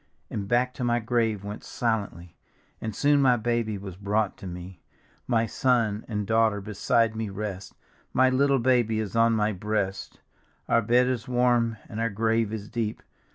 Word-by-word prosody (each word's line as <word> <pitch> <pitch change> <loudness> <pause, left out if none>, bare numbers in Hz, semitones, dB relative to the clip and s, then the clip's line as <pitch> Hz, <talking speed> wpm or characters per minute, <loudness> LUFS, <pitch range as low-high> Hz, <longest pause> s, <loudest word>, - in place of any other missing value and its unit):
And 100 -2 -3
back 125 +3 +1
to 125 - -5
my 120 0 +2
grave 115 -3 0
went 105 +1 -7
silently, 100 -7 -3 0.5
And 110 -2 -4
soon 145 0 +3
my 125 -3 +4
baby 115 -2 -1
was 95 -2 -8
brought 105 +1 0
to 95 - -8
me; 90 +1 -8 0.5
My 115 -2 +2
son 115 -4 +1
and 105 -3 -2
daughter 110 -1 +2
beside 110 +2 +1
me 110 -1 -3
rest, 95 -1 -6 0.4
My 130 +1 +4
little 135 +2 +3
baby 120 -3 +2
is 105 -2 -4
on 115 0 +4
my 110 -1 +1
breast; 100 0 -3 0.5
Our 115 - +3
bed 120 +3 +3
is 125 -2 -2
warm 120 -2 +2
and 110 - -6
our 115 0 +1
grave 110 +1 0
is 105 -2 -5
deep. 110 -2 -3
110 Hz, 170 wpm, -26 LUFS, 105-120 Hz, 0.5 s, my